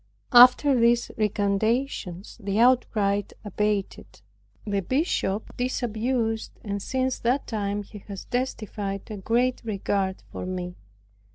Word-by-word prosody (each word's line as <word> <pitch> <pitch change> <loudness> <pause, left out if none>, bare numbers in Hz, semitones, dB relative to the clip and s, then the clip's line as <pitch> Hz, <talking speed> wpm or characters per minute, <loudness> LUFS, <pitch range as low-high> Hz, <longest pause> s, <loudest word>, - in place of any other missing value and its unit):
After 250 +3 +8
these 235 +1 +3
recantations 210 -1 -1
the 200 0 -2
outcry 220 -5 +3 0.2
abated, 210 0 -2 0.4
the 200 -2 0
bishop 220 - -1
disabused, 235 -2 -1
and 200 -1 -3
since 260 +3 -1
that 250 +4 +1
time 205 -2 -2
he 210 +1 -11
has 195 -2 -7
testified 210 -5 -3
a 210 - -5
great 245 +6 +1
regard 195 -3 -2
for - - -5
me. 180 -1 -4
215 Hz, 110 wpm, -26 LUFS, 200-245 Hz, 0.4 s, After